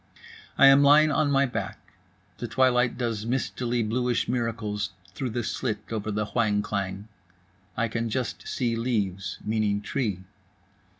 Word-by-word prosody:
I 140 Hz, -, +7 dB
am 135 Hz, +1 st, +8 dB
lying 150 Hz, +2 st, +6 dB
on 150 Hz, 0 st, +2 dB
my 140 Hz, 0 st, +3 dB
back, 125 Hz, -, -4 dB, 0.6 s
the -, -, -3 dB
twilight 125 Hz, -2 st, +2 dB
does 115 Hz, -4 st, -2 dB
mistily 120 Hz, 0 st, -1 dB
bluish 125 Hz, +2 st, 0 dB
miracles 110 Hz, -4 st, -2 dB, 0.2 s
through 130 Hz, +3 st, -3 dB
the 120 Hz, +1 st, -2 dB
slit 110 Hz, -2 st, -3 dB
over 110 Hz, -1 st, -3 dB
the 105 Hz, 0 st, -1 dB
whang 105 Hz, -2 st, +1 dB
klang. 100 Hz, -1 st, -3 dB, 0.7 s
I 115 Hz, +1 st, +1 dB
can 115 Hz, +1 st, -2 dB
just 125 Hz, +2 st, -3 dB
see 120 Hz, -3 st, -1 dB
leaves, 105 Hz, -5 st, -2 dB
meaning 105 Hz, -2 st, +1 dB
tree. 105 Hz, -3 st, -2 dB
115 Hz, 140 wpm, -26 LUFS, 105-125 Hz, 0.7 s, am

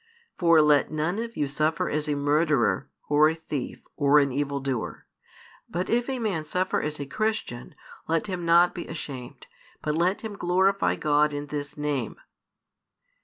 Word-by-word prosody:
For 165 Hz, -3 st, +5 dB
let 150 Hz, -1 st, +4 dB
none 155 Hz, +6 st, -1 dB
of 230 Hz, 0 st, -5 dB
you 145 Hz, -, +1 dB
suffer 155 Hz, +3 st, 0 dB
as 150 Hz, 0 st, -1 dB
a 145 Hz, -, +1 dB
murderer, 145 Hz, -3 st, +1 dB, 0.2 s
or 150 Hz, +1 st, +5 dB
a 160 Hz, -, -2 dB
thief, 150 Hz, -5 st, -5 dB
or 145 Hz, 0 st, +4 dB
an 140 Hz, -2 st, +4 dB
evil 140 Hz, +1 st, -1 dB
doer: 135 Hz, -4 st, -4 dB, 0.6 s
but 175 Hz, +2 st, -3 dB
if 240 Hz, +2 st, +1 dB
a 265 Hz, -, -1 dB
man 205 Hz, -9 st, -1 dB
suffer 180 Hz, +4 st, -1 dB
as 150 Hz, 0 st, -4 dB
a 140 Hz, -, -3 dB
Christian 150 Hz, -, -3 dB, 0.3 s
let 165 Hz, 0 st, +1 dB
him 185 Hz, -4 st, -4 dB
not 170 Hz, +1 st, +5 dB
be 175 Hz, -, -6 dB
ashamed; 135 Hz, -6 st, -7 dB, 0.3 s
but 150 Hz, -, -2 dB
let 175 Hz, +5 st, +1 dB
him 220 Hz, -2 st, -6 dB
glorify 190 Hz, +2 st, +2 dB
God 150 Hz, 0 st, +2 dB
in 145 Hz, 0 st, -4 dB
this 145 Hz, 0 st, -5 dB
Name. 145 Hz, -6 st, -2 dB
155 Hz, 170 wpm, -26 LUFS, 145-175 Hz, 0.6 s, For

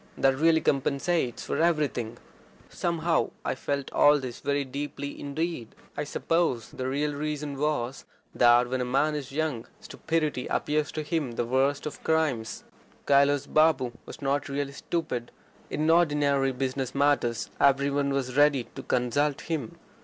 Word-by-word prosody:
That 135 Hz, 0 st, +3 dB
really 160 Hz, +3 st, +3 dB
compensates 140 Hz, 0 st, 0 dB
for 150 Hz, -, -1 dB
everything." 145 Hz, -9 st, 0 dB, 0.5 s
Somehow 170 Hz, -1 st, 0 dB, 0.2 s
I -, -, 0 dB
felt 140 Hz, +1 st, -3 dB
all 145 Hz, 0 st, +6 dB
this 130 Hz, -4 st, -6 dB
very 140 Hz, 0 st, -1 dB
deeply 140 Hz, +1 st, -5 dB
indeed. 145 Hz, -4 st, -4 dB, 0.2 s
I 150 Hz, -, -2 dB
suppose 155 Hz, -6 st, 0 dB
the 130 Hz, -, -4 dB
real 145 Hz, +3 st, -1 dB
reason 150 Hz, 0 st, -3 dB
was, 135 Hz, -3 st, -2 dB, 0.3 s
that 120 Hz, 0 st, +5 dB
when 130 Hz, +1 st, -2 dB
a 125 Hz, +1 st, -2 dB
man 155 Hz, +1 st, +1 dB
is 145 Hz, -3 st, -5 dB
young 145 Hz, -5 st, -2 dB
stupidity 160 Hz, -10 st, -2 dB
appears 150 Hz, 0 st, 0 dB
to 155 Hz, -, -3 dB
him 150 Hz, -5 st, -2 dB
the 120 Hz, -, -1 dB
worst 135 Hz, +4 st, +1 dB
of 150 Hz, -, -6 dB
crimes. 155 Hz, -8 st, 0 dB, 0.4 s
Kailas 140 Hz, 0 st, +4 dB
Babu 155 Hz, -5 st, +3 dB, 0.2 s
was 155 Hz, -, -10 dB
not 140 Hz, +1 st, 0 dB
really 140 Hz, 0 st, -2 dB
stupid. 140 Hz, -5 st, -3 dB, 0.4 s
In 155 Hz, +1 st, -1 dB
ordinary 145 Hz, -5 st, +3 dB
business 130 Hz, 0 st, -3 dB
matters 140 Hz, -5 st, +1 dB
every 140 Hz, 0 st, +4 dB
one 140 Hz, 0 st, 0 dB
was 130 Hz, -2 st, -2 dB
ready 145 Hz, -3 st, +4 dB
to -, -, -7 dB
consult 135 Hz, +4 st, 0 dB
him. 155 Hz, -9 st, -4 dB
140 Hz, 150 wpm, -27 LUFS, 130-150 Hz, 0.5 s, all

